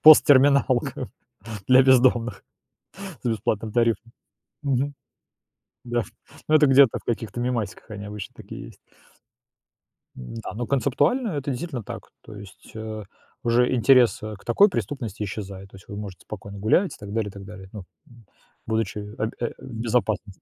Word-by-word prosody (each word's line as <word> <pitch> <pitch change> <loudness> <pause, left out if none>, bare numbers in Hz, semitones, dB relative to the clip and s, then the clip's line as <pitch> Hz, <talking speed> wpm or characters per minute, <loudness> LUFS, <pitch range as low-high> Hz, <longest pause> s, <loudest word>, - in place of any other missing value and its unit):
посттерминалка 140 -4 +6 0.6
для 130 +1 +7
бездомных 125 -2 +3 0.8
с 125 - -1
бесплатным 110 -1 -1
тарифом. 115 0 +1 0.5
Мгм. 140 0 0 0.9
Да 120 0 0
ф 100 - -9 0.4
Ну, 155 - +4
это 155 -1 +7
где-то 135 -2 +6
в - - -24
каких-то 115 0 -3
мемасиках 120 -4 -3
они 100 -1 -6
обычно 105 -1 -7
такие - - -9
есть. - - -16 1.4
Н-да, 110 - -7
ну, 120 +3 -3
концептуально 145 - +1
это 145 -5 -2
действительно 130 -2 -4
так, - - -8
то 110 - -12
есть, 100 -2 -13
э, 110 -1 -6 0.4
уже 120 +2 +3
интерес, 125 -2 +5
э, 110 0 -5
к - - -21
такой 200 - +5
преступности 115 - -4
исчезает, 95 -1 -6
то - - -14
есть 95 - -15
вы 100 - -6
можете 100 -4 -7
спокойно 100 -1 -8
гулять 140 - +2
и - - -17
так 100 -1 -9
далее 110 -2 -1
и - - -11
так 100 0 -10
далее. 95 -2 -10
Ну, 105 - -7 0.2
м, 120 -2 -18 0.4
будучи 110 -2 -1 0.2
абь 110 +1 -1
в 120 - -2 0.3
безопасности. 110 -4 -1
115 Hz, 155 wpm, -24 LUFS, 105-130 Hz, 1.4 s, для